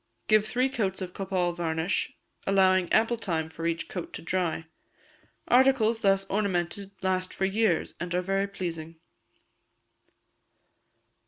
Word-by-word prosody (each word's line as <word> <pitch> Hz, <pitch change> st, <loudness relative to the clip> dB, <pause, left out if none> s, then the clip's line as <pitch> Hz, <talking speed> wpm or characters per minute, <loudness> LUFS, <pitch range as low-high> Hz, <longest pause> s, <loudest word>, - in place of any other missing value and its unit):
Give 215 Hz, 0 st, +4 dB
three 255 Hz, +3 st, +1 dB
coats 210 Hz, -8 st, -2 dB
of 180 Hz, -1 st, -7 dB
copal 185 Hz, -3 st, -1 dB
varnish, 165 Hz, +1 st, -1 dB, 0.4 s
allowing 185 Hz, -2 st, +4 dB
ample 230 Hz, +2 st, +3 dB
time 165 Hz, -7 st, -2 dB
for 165 Hz, +1 st, -3 dB
each 165 Hz, 0 st, -2 dB
coat 180 Hz, -, -6 dB
to -, -, -7 dB
dry. 165 Hz, -2 st, -1 dB, 0.8 s
Articles 245 Hz, -3 st, +4 dB
thus 195 Hz, -2 st, +3 dB
ornamented 195 Hz, -1 st, -1 dB
last 185 Hz, 0 st, 0 dB
for 190 Hz, -, 0 dB
years, 195 Hz, -3 st, +1 dB
and 175 Hz, +1 st, -3 dB
are 180 Hz, -, +1 dB
very 195 Hz, +2 st, 0 dB
pleasing. 165 Hz, -4 st, -5 dB
190 Hz, 130 wpm, -28 LUFS, 175-205 Hz, 0.8 s, Give